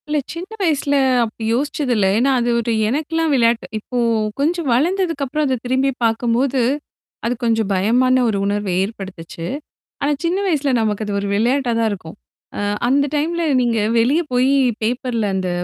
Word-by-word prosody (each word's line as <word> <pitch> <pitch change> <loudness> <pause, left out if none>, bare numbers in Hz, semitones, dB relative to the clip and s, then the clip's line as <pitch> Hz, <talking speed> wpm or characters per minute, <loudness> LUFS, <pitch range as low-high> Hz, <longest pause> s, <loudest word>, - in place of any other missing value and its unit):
இல்ல 300 0 0 0.2
சின்ன 345 +3 -7
வயசுல 295 -5 +1 0.3
அப்டி 225 0 -6
யோசிச்சது 280 +1 -1
இல்ல. 205 -3 +2
ஏன்னா 265 +4 +3
அது 240 0 0
ஒரு 235 0 -1 0.2
எனக்கல்லாம் 315 +4 0
விளையாட்டு. 235 -2 +2
இப்போ 245 +4 -6 0.4
கொஞ்சம் 330 +2 0
வளர்ந்ததுக்குப்புறம் 305 -1 0
அத 260 -1 0
திரும்பி 260 +2 +1
பார்க்கும்போது, 240 +3 +1 0.6
அது 235 - +1
கொஞ்சம் 225 -3 +1
பயமான 250 +7 +3
ஒரு 205 - 0
உணர்வ 205 0 -1
ஏற்படுத்துச்சு. 190 -4 -7 0.5
ஆனா 285 - +1
சின்ன 345 +3 +1
வயசுல 290 -6 +1
நமக்கு 215 -1 -1
அது 205 - -3
ஒரு 200 - -3
விளையாட்டா 245 +4 +1
தான் 225 -1 +2
இருக்கும். 185 -3 -8 0.4
அ - - -3 0.3
அந்த 280 +3 +3
டைம்ல 335 +4 0 0.2
நீங்க 235 -2 +1 0.2
வெளிய 270 +9 +3
போயி 255 +3 +3 0.3
பேப்பர்ல 240 -1 -1
அந்த 185 -1 -1
250 Hz, 155 wpm, -19 LUFS, 220-285 Hz, 0.6 s, ஏன்னா